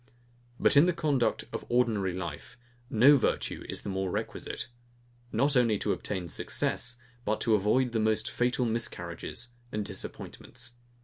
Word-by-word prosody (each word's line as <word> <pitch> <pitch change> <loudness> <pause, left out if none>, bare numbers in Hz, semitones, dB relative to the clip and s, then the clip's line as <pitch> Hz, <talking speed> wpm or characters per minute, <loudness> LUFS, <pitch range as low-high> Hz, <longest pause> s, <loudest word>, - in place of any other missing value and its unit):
But - - +4
in 145 +5 +7
the 180 - +3
conduct 150 -7 +1
of - - -3
ordinary 115 -6 +2
life, 95 +7 -6 0.3
no 130 +6 +7
virtue 125 - -1
is - - -4
more 95 -1 -1
requisite, 90 - -3 0.7
not 140 +6 +2
only 115 -4 +4
to - - 0
obtain 95 -4 -3
success, 120 +7 0 0.3
but 110 -1 0
to 115 - +3
avoid 110 +5 +3
the 115 - 0
most 110 0 +1
fatal 125 +1 +1
miscarriages 110 0 -2 0.2
and 105 -1 -2
disappointments. 120 +3 -6
115 Hz, 140 wpm, -29 LUFS, 105-125 Hz, 0.7 s, in